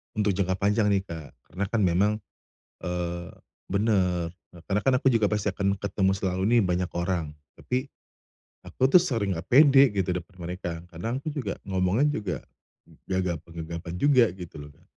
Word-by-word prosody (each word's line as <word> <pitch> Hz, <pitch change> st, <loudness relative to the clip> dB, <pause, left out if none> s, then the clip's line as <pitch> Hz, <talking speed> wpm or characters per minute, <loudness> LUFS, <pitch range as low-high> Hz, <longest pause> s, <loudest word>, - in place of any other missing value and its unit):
Untuk 105 Hz, -1 st, +2 dB
jangka 95 Hz, -1 st, 0 dB
panjang 105 Hz, +2 st, +2 dB
nih 100 Hz, -2 st, +2 dB
Kak, 80 Hz, -6 st, -9 dB, 0.2 s
karena 100 Hz, +2 st, -2 dB
kan 110 Hz, 0 st, 0 dB
memang, 95 Hz, +3 st, +3 dB, 0.7 s
eee 85 Hz, 0 st, -3 dB, 0.4 s
benar, 95 Hz, -5 st, +1 dB, 0.4 s
karena 100 Hz, +1 st, +1 dB
kan 135 Hz, -, +3 dB
aku 135 Hz, -, -10 dB
juga 110 Hz, -2 st, +3 dB
pasti 105 Hz, -1 st, -1 dB
akan 100 Hz, 0 st, -1 dB
ketemu 100 Hz, -1 st, 0 dB
selalu 95 Hz, -1 st, -2 dB, 0.2 s
nih -, -, +6 dB
banyak 90 Hz, -1 st, 0 dB
orang, 85 Hz, -3 st, -1 dB, 0.2 s
tapi 130 Hz, +2 st, -2 dB, 0.8 s
aku 130 Hz, -, 0 dB
tuh 175 Hz, +5 st, +7 dB
sering 115 Hz, -, -1 dB
enggak 85 Hz, +1 st, -7 dB
pede 140 Hz, 0 st, +7 dB
gitu 95 Hz, -1 st, 0 dB
depan 90 Hz, +1 st, -7 dB
mereka, 85 Hz, -2 st, -5 dB
kadang 115 Hz, +10 st, -3 dB
aku 155 Hz, -, -4 dB
juga 125 Hz, -10 st, -3 dB
ngomongnya 95 Hz, +7 st, +1 dB, 0.2 s
juga 90 Hz, -8 st, -3 dB, 0.7 s
gagap-gagapan 85 Hz, -2 st, -3 dB
juga 130 Hz, 0 st, +5 dB
gitu 90 Hz, -3 st, -10 dB
loh, 75 Hz, -, -10 dB
Kak. -, -, -27 dB
95 Hz, 160 wpm, -26 LUFS, 90-105 Hz, 0.8 s, tuh